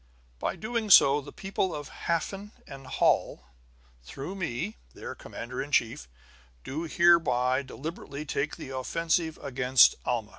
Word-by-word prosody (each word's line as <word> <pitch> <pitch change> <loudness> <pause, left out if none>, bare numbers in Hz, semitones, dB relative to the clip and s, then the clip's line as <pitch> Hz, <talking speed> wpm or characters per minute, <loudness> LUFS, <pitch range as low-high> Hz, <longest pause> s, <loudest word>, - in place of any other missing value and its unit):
"By - - -1
so - - -13
doing, 225 0 -3 0.4
the - - -9
people 190 -1 -2
of 145 -1 -7 0.2
Hafen 195 +5 -2
and 135 -1 -11
Holl, 70 - +1 0.6
through 140 - -7
me, 120 - -4 0.2
their - - -7
commander 125 +2 -7
in 145 - -7
chief, 115 - 0 0.6
do 160 +5 -4
hereby 140 -8 +3
deliberately 145 +1 -7
take 145 0 -2
the - - -9
offensive 165 +4 -1
against 130 -2 +5
Alma." 115 -4 -2
145 Hz, 135 wpm, -28 LUFS, 125-170 Hz, 0.6 s, against